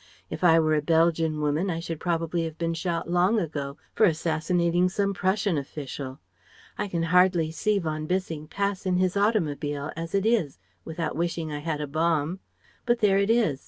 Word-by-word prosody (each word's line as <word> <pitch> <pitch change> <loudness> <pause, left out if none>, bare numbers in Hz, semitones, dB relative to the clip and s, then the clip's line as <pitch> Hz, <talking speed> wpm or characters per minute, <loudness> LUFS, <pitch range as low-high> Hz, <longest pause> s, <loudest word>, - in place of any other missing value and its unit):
If - - -5
I 165 -2 +6
were 155 -1 +2
a 150 - +2
Belgian 160 -1 +2
woman 150 +6 0
I 165 -2 -2
should 165 -2 -5
probably 165 -1 -1
have 160 -1 -6
been 165 0 -1
shot 165 0 -2
long 180 +5 +2
ago 145 -5 -4 0.2
for 215 - +4
assassinating 170 +2 +1
some 200 +1 0
Prussian 190 -3 0
official 135 -1 -7 0.6
I - - -2
can 170 -3 -2
hardly 175 -1 +3
see 210 +5 0
von 155 -4 -3
Bissing 165 -4 -2
pass 200 +1 -2
in 180 -1 +2
his 185 0 +1
automobile, 150 -9 0
as 165 +3 -4
it 195 +1 +1
is, 220 - +1 0.3
without 160 -1 -4
wishing 170 -1 -2
I 145 - -3
had 155 0 -3
a - - -1
bomb. 160 +3 0 0.5
But 240 0 +3
there 200 -3 +3
it 200 +1 +1
is. 220 - +2
165 Hz, 185 wpm, -26 LUFS, 155-185 Hz, 0.6 s, I